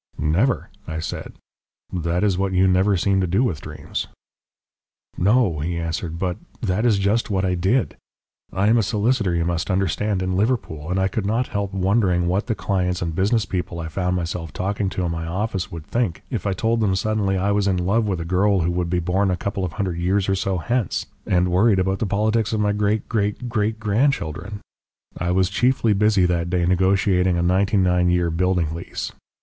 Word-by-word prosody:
"Never," 90 - +1 0.2
I 80 - -4
said. 80 - -5 0.6
"That 85 +1 -1
is 100 -3 +2
what 95 +1 -1
you 95 +1 +4
never 95 +2 +3
seem 95 +2 +2
to 90 - 0
do 95 +8 +2
with 85 - -1
dreams." - - -5 1.1
"No," 100 -4 +2
he 85 +3 -2
answered. 85 0 -3
"But 90 0 -2 0.2
that 100 +6 0
is 110 -4 +3
just 100 +4 +1
what 95 -2 0
I 90 - +1
did. 95 +8 0 0.5
I 95 - 0
am 115 +2 +4
a - - +4
solicitor, 105 -2 +1
you 85 -1 0
must 85 +2 -1
understand, 95 +1 0
in 95 0 -1
Liverpool, 95 - -1
and 95 +1 0
I 95 - +2
could 100 +1 -2
not 115 +4 0
help 100 -2 -2
wondering 95 -2 +1
what 95 +4 0
the 115 - 0
clients 90 -3 -1
and 85 -1 -2
business 105 +6 +1
people 90 -2 -4
I 80 -1 -4
found 90 +2 -1
myself 85 -2 -3
talking 100 +4 -2
to 95 -1 -2
in 85 - -1
my 80 0 -4
office 95 +2 -2
would 85 -2 -7
think 115 -7 -1
if 105 -6 -2
I 100 - +1
told 115 +5 0
them 100 -4 +2
suddenly 100 -1 0
I 100 +2 +1
was 100 -1 +1
in 95 -2 +2
love 100 +5 +1
with 95 -4 -1
a 85 - -4
girl 95 +2 +2
who 85 +2 0
would 85 -1 -1
be 90 - +1
born 95 +3 +1
a 90 - 0
couple 100 +1 -3
of 90 -4 -3
hundred 90 -2 -2
years 95 +3 +1
or 95 - +2
so 95 0 -1
hence, 115 +5 -1 0.2
and 90 -1 +2
worried 100 +3 +4
about 95 +1 0
the 110 - -1
politics 110 +2 +1
of 110 - 0
my 105 -1 +2
great 105 +1 0
great 105 +2 -1
great 110 -1 -1
grandchildren. 105 - -1 0.6
I 90 - -1
was 90 +1 +3
chiefly 115 +1 +2
busy 105 -2 +3
that 85 -1 0
day 90 -1 +1
negotiating 95 0 +2
a 85 - +1
ninety 95 +4 +2
nine 90 -1 +3
year 90 -1 +1
building 85 -2 0
lease. 85 - -5
95 Hz, 210 wpm, -22 LUFS, 90-105 Hz, 1.1 s, you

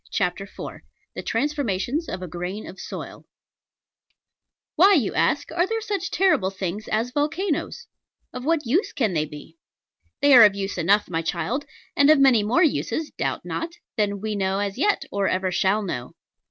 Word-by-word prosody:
CHAPTER 190 0 -1
IV 200 - -9 0.3
THE - - -5
TRANSFORMATIONS 275 - -1
OF 185 0 -5
A - - -5
GRAIN 180 +5 -5
OF 190 - -10
SOIL - - -8 1.5
Why, 385 +5 +6
you 250 - +1
ask, 285 - +1
are 350 +2 +1
there 450 +2 -1
such 405 -4 -3
terrible 365 - +2
things 195 +2 -5
as 225 +3 -1
volcanos? 320 - -2 0.5
Of 250 - -6
what 315 0 +1
use 310 - +1
can 220 -8 0
they 155 -2 +1
be? 150 - -12 0.6
They 285 -1 +5
are 240 -3 +10
of 205 -2 +5
use 195 -2 -3
enough, 200 +5 +3
my 165 -2 -2
child; 180 - -2 0.3
and 285 +1 +5
of 310 - +7
many 265 -5 +5
more 235 - +2
uses, 315 0 0
doubt - - -3
not, 330 +1 -4 0.2
than 205 -3 -1
we 215 0 -2
know 190 -1 0
as 200 -1 -2
yet, 410 +6 +1
or 200 -1 0
ever 185 0 0
shall 195 +4 +1
know. 125 -10 -5
220 Hz, 175 wpm, -24 LUFS, 190-300 Hz, 1.5 s, are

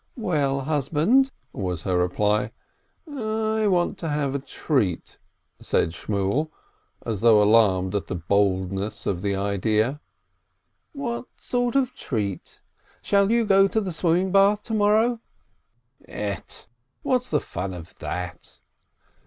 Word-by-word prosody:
"Well, 145 - 0
husband?" 155 - +2 0.2
was 90 -4 -3
her 95 - 0
reply. 105 +5 +1 0.6
"I 220 -5 -1
want 180 -3 +1
to 165 - -3
have 145 -2 -1
a 140 - -1
treat," 130 - -2 0.4
said - - 0
Shmuel, 100 - -1 0.6
as 110 -4 -3
though 115 -2 +6
alarmed 105 -3 +4
at 100 - -2
the - - -3
boldness 95 +2 0
of 90 -3 -1
the 100 0 0
idea. 105 +7 0 0.9
"What 250 -5 -4
sort 245 0 -1
of 260 -2 +2
a - - -37
treat? 100 - -4 0.4
Shall 200 -1 +3
you 230 0 +3
go 195 -1 +5
to 220 - 0
the 195 -4 -3
swim 165 0 +1
ming 185 +1 0
bath 200 +2 +4
to 225 - -5
morrow 220 +3 +3 0.5
?" 120 +2 -48
"Ett! 105 -1 -5 0.4
What's 250 -1 0
the - - +2
fun 95 +2 -5
of 85 +1 -10
that 90 -1 -6
135 Hz, 135 wpm, -24 LUFS, -, 0.9 s, though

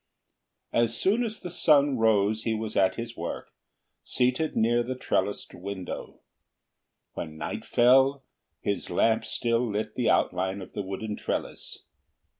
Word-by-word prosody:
As 115 0 +2
soon 215 +6 +2
as 220 -2 -3
the 180 - -7
sun 145 -6 +4
rose 110 -1 +3
he 115 -1 -1
was 110 0 -4
at 95 -1 +3
his 115 0 -6
work, - - -6 0.5
seated 130 +5 +1
near 120 +2 +3
the 125 +2 -3
trellised 125 - -1
window. 95 0 -7 0.9
When 80 -1 -6
night 75 - -5
fell, 135 +3 +4 0.4
his 100 - -2
lamp 110 0 +2
still 115 -1 +1
lit 110 -1 -2
the 125 - 0
outline 95 +2 +1
of 95 - -10
the 105 - -3
wooden 100 +2 -5
trellis. - - -4
115 Hz, 140 wpm, -27 LUFS, 105-130 Hz, 0.9 s, sun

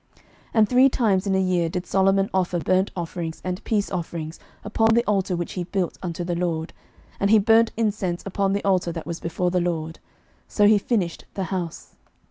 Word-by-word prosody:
11:009:025 - - -28 0.3
And 220 -2 +5
three 255 +2 +6
times 210 -6 +1
in 190 - +1
a - - +2
year 180 -3 +1
did 180 +2 -4
Solomon 195 0 +2
offer 180 -1 +1
burnt 185 +3 +1
offerings 170 -2 -5
and 180 0 -3
peace 210 -3 -1
offerings 165 -3 -5 0.2
upon 225 +1 +2
the 235 +1 +2
altar 195 -3 0
which 175 -1 -4
he 180 - -3
built 185 -1 -2
unto 175 -1 -4
the 175 0 -2
LORD, 170 -2 -2 0.5
and 200 - +1
he 220 - +7
burnt 225 +2 +4
incense 205 -6 -1
upon 195 0 0
the 200 - -1
altar 185 -3 +2
that 165 -1 -6
was 170 0 -5
before 175 +2 -1
the 180 0 +1
LORD. 165 -2 -3 0.5
So 205 - +2
he 210 0 +6
finished 195 -6 -2
the 195 - -2
house. 175 -3 -5
185 Hz, 200 wpm, -23 LUFS, 175-205 Hz, 0.5 s, he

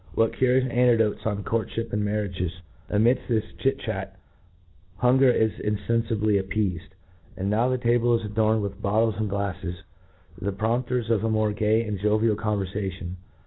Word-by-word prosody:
^what 115 0 +3
curipus 130 0 +3
anecdotes 120 -3 +3
on 105 -1 -2
courtfhip 115 +1 -2
and 105 0 0
marriages! 100 -4 -2 0.4
Amidft 115 +5 +2
this 110 -3 +1
eafy - - -18
chitr - - +2
chat) - - -4 0.8
hunger 130 +4 +4
is 110 -2 +3
infeni^bly 105 0 +1
appeafed; 95 -1 -3 0.4
and 95 +2 -1
now 115 +4 +2
the 130 - +1
table 120 0 +2
is 115 - -6
adorned 110 +1 +1
with 100 0 -5
bottles 110 +1 +1
and 110 -1 -1
glafles, 95 -3 -3 0.6
the 100 - -1
prompters 120 +3 -1
of 110 -2 +2
a 115 - +1
more 110 -1 +1
gay 110 +2 +2
and 105 -3 -4
jovial 105 +2 +2
converfation. 95 -3 -3
110 Hz, 155 wpm, -25 LUFS, 100-115 Hz, 0.8 s, hunger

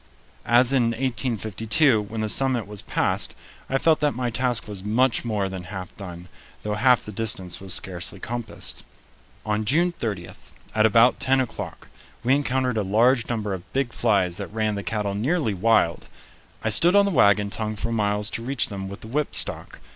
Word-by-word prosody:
As 120 +2 +4
in 130 -3 +3
1852, 115 - +1
when 110 +2 -5
the 110 - -1
summit 130 0 +1
was 105 -1 -9
passed - - -1 0.3
I 135 - +1
felt 160 +2 +3
that 150 -1 +1
my 125 -1 -2
task 125 -1 -1
was 100 -3 -7
much 115 +4 +1
more 105 -4 -1
than 95 -2 -7
half 95 0 -8
done, 90 -2 -9 0.4
though 105 - -2
half 125 +4 +3
the 105 - -6
distance 95 -4 -3
was 95 -2 0
scarcely 95 +1 -5
compassed. 120 +1 -5 0.6
On 105 0 0
June 165 +10 +2
30, 105 - -5 0.4
at 110 0 +4
about 115 +3 +4
ten 135 +1 +2
o'clock, 130 -3 -5 0.4
we 130 - +3
encountered 130 -3 0
a - - +2
large 115 +5 +2
number 110 -4 -2
of 95 0 -9
big 135 -3 -1
flies 95 -6 +1
that 100 - -5
ran 110 -1 -1
the 100 - -3
cattle 105 -1 -2
nearly 125 - 0
wild. 100 -3 +2 0.6
I 110 - +1
stood 170 - +5
on 200 0 +6
the 200 - 0
wagon 100 - +3
tongue 110 0 -3
for 115 +3 -4
miles 105 -1 0
to - - -3
reach 135 0 0
them 95 -1 -6
with 100 +3 -9
the - - -9
whipstock. 145 +6 +1
110 Hz, 185 wpm, -24 LUFS, 100-125 Hz, 0.6 s, on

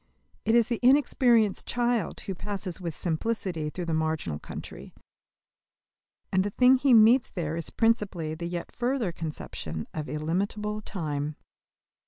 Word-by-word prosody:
It 225 +1 +3
is 235 -2 +5
the 235 -2 -2
inexperienced 245 -5 +4
child 240 -2 0
who 195 - -4
passes 190 -1 -4
with 170 -3 -4
simplicity 175 -2 -2
through 175 +3 -5
the 165 - -1
marginal 155 - -1
country; - - -9 1.4
and 190 0 +3
the 205 - -1
thing 250 +5 +5
he 270 +1 +2
meets 230 +2 +6
there 165 -3 -3
is 165 - -3
principally 200 -9 0
the 170 +2 -5
yet 175 0 -5
further 245 -5 -1
conception 85 - -6
of 155 -2 -4
illimitable 200 +7 -2
time. 150 -7 -3
190 Hz, 140 wpm, -27 LUFS, 160-230 Hz, 1.4 s, meets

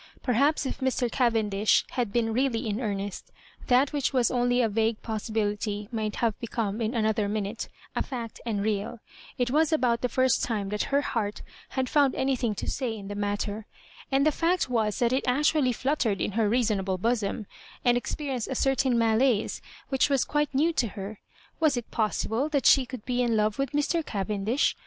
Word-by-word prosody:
Perhaps 280 +5 +2
if - - -4
Mr. 255 -2 0
Cavendish 220 -5 +2
bad 240 -5 0
been 225 -1 +1
really 245 -2 0
in 210 +1 -1
earnest, 200 -3 -4 0.4
that 260 +3 +3
which 285 -3 0
was 250 -3 +3
only 245 0 +2
a 240 - +3
vague 220 +1 0
possibility 210 -1 -2
might 215 -2 -2
have 230 -3 0
become, 225 -2 -3
in 225 +3 -1
another 215 -2 +1
minute, 210 +1 -3 0.3
a - - 0
fact 235 -4 -5
and 210 -4 -2
real 210 +2 -1 0.4
It 245 -1 0
was 315 +2 +3
about 245 -7 +2
the 250 - 0
first 260 -1 +2
time 210 -4 -1
that 210 +1 -1
her 280 0 +3
heart 215 -7 -2 0.3
had 260 -1 +1
found 285 -2 +3
anything 260 -5 0
to - - -5
say 245 -4 -2
in 200 -1 -8
the - - -4
matter; 205 +1 -3 0.4
and 270 +1 +3
the 310 - +5
fact 345 +4 +1
was 220 -3 +1
that 240 0 +2
it 260 - 0
actually 295 +1 +3
fluttered 245 -5 0
in - - -1
her 215 0 +1
reasonable 205 -5 +1
bosom, 215 0 -1 0.4
and 245 -1 +5
experienced 255 0 -3
a 265 - -3
certain 265 -1 +2
mdiaue 230 0 +2 0.3
which 265 +1 +2
was 275 -3 +3
quite 295 0 0
new 305 +5 +2
to 240 - +1
her. 200 +2 -6 0.4
Was 305 -5 +3
it 240 - -5
possible 225 +4 0
that 280 -5 0
she 265 -3 +6
could 250 -3 -8
be 250 -1 0
in 235 -2 +2
love 215 +3 +1
with 275 - 0
Mr. 295 +3 +1
Cavendish 210 +3 0
235 Hz, 190 wpm, -27 LUFS, 215-265 Hz, 0.4 s, she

